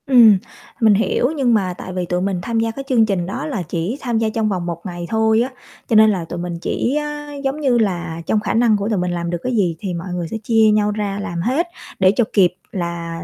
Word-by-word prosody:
Ừm, 235 -6 +7 0.4
mình 220 -2 +6
hiểu, 235 +5 +1
nhưng 260 -5 +2
mà 190 -4 +1
tại 185 - -7
vì 180 -1 -2
tụi 180 +1 -1
mình 190 -1 -1
tham 230 +5 -1
gia 225 0 0
cái 275 +4 -7
chương 235 -4 +4
trình 195 -5 -1
đó 190 - -4
là 265 - -3
chỉ 170 - -3
tham 240 -3 -1
gia 220 0 +1
trong 215 0 0
vòng 180 -4 -2
1 170 +1 -5
ngày 175 -2 -5
thôi 220 0 +3
á, 250 - 0 0.4
cho 230 - +1
nên 220 0 +7
là 185 -5 -1
tụi 175 +1 -6
mình 175 -1 -4
chỉ 255 +8 -1
á 295 0 -6
giống 270 +2 -1
như 260 -4 +3
là 175 -6 -1
trong 215 - +1
khả 210 - -2
năng 225 -2 +4
của 200 +1 -2
tụi 215 - 0
mình 180 0 -1
làm 170 -1 -3
được 175 - -1
cái 255 -1 -1
gì 180 -6 +1
thì 190 -2 -4
mọi 170 +2 -5
người 175 -2 -3
sẽ 220 - -4
chia 220 -1 +4
nhau 210 0 +2
ra 205 -1 -3
làm 170 -4 -4
hết 270 - 0 0.3
để 185 -1 +5
cho 240 - +3
kịp 180 -4 +4 0.2
là 170 -2 -4
205 Hz, 265 wpm, -19 LUFS, 175-230 Hz, 0.4 s, Ừm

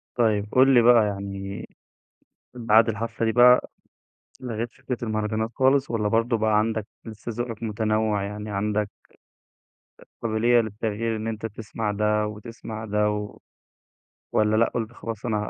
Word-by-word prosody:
طيب، 105 -3 +1
قل 130 +1 +5
لي 120 - +7
بقى 120 -2 +6
يعني 100 0 -5 0.9
بعد 115 -1 +4
الحفلة 115 +1 -2
دي 110 - +2
بقى 125 +2 +6 0.7
لغيت 120 -1 -4
فكرة 125 -2 -5
المهرجانات 110 0 -1
خالص 135 +1 +2
والّا 105 -3 0
برضو 115 +2 +2
بقى 110 -1 +2
عندك 110 -1 -1 0.2
لسه 110 +1 -7
ذوقك 120 -2 -5
متنوع 110 -1 0
يعني 105 +1 -6
عندك 105 0 -1 1.1
أ - - -15 0.2
قابلية 115 +1 +3
للتغيير 110 +1 -3
إن 110 +1 -4
أنت 110 0 -4
تسمع 110 0 -4
ده 105 +1 +1
وتسمع 110 +1 -8
ده، 105 0 +1
و 105 0 -4 0.9
والّا 105 0 +2
لأ، 115 - +4
قلت 115 -1 -3
خلاص 115 0 -6
أنا 110 - 0
110 Hz, 145 wpm, -25 LUFS, 105-115 Hz, 1.1 s, لي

